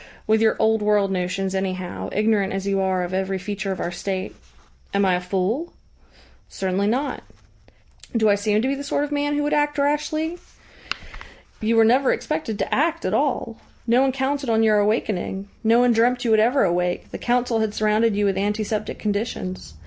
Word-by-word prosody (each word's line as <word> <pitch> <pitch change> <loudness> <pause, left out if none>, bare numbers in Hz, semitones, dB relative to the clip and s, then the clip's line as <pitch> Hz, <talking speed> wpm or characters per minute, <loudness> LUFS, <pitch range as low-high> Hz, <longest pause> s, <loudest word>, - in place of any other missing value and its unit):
"With 220 0 +3
your 220 -1 +3
old 220 0 +2
world 210 -2 +2
notions, 185 +1 -2
anyhow, 185 -2 -3
ignorant 210 -2 +1
as 195 0 -3
you 195 -1 0
are 190 -1 +1
of 175 +1 -5
every 190 0 -1
feature 195 +1 -4
of 190 - -4
our 175 - -2
State." 185 +2 -4 0.6
"Am 200 0 +3
I 185 - +3
a 180 - 0
fool?" 195 - -2 0.8
"Certainly 190 +1 -1
not." 260 +7 -1 1.0
"Do 220 -1 +3
I 205 - +5
seem 210 +2 +1
to - - +1
be 270 - +1
the 280 +1 -5
sort 285 0 -1
of 295 - -4
man 290 0 0
who 295 - 0
would 295 - 0
act 295 0 +1
rashly?" 300 +4 0 1.2
"You 225 +1 +1
were 225 0 +6
never 255 +4 +4
expected 305 -9 -2
to - - -2
act 330 +3 +1
at 185 - 0
all. 245 -3 0 0.3
No 240 +2 +4
one 270 0 +3
counted 270 0 -2
on 225 0 +3
your 215 -1 +4
awakening. 205 -2 -1
No 225 +1 +4
one 245 0 +4
dreamt 245 +2 +2
you 230 - +2
would 220 - +5
ever 245 +6 +3
awake. 175 0 -1
The - - -6
Council 240 -1 +1
had 220 -1 -1
surrounded 215 0 +2
you 205 0 +1
with 195 -1 +1
antiseptic 210 +1 -2
conditions. 205 - -4
215 Hz, 195 wpm, -23 LUFS, 195-250 Hz, 1.2 s, were